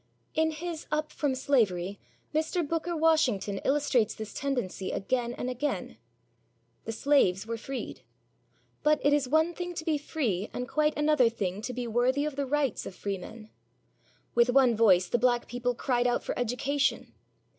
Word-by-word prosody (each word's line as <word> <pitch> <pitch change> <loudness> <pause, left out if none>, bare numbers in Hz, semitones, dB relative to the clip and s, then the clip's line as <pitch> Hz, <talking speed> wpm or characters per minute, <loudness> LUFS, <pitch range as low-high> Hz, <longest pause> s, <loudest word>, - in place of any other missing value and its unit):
In 320 0 +2
his 325 +1 -5
Up 305 0 -1
From 285 -3 -1
Slavery, 205 -9 +1 0.3
Mr. 320 +1 0
Booker 330 +2 -2
Washington 260 -12 +2
illustrates 270 -6 +2
this 220 -1 -7
tendency 245 -9 -2
again 240 +3 -1
and - - -4
again. 255 +4 -3 0.9
The - - -3
slaves 220 -6 +2
were 230 +1 -3
freed. 265 +4 -6 0.8
But 300 0 +3
it 290 - +5
is 285 -3 +1
one 315 +4 +3
thing 355 0 -5
to 320 - -5
be 310 -2 +1
free, 230 - -2
and 250 0 -3
quite 300 +3 +1
another 295 -5 +4
thing 200 -3 -3
to 250 - -4
be 250 0 -4
worthy 245 +5 +1
of 300 -2 -3
the 280 -1 -2
rights 280 -3 0
of 185 - -8
freemen. 205 +3 -6 0.8
With 235 +1 +4
one 250 -2 +5
voice 190 -5 +5
the 240 - +1
black 240 0 +2
people 245 0 -2
cried 245 0 +1
out 245 - 0
for - - -2
education. 265 +4 0
255 Hz, 165 wpm, -29 LUFS, 225-295 Hz, 0.9 s, it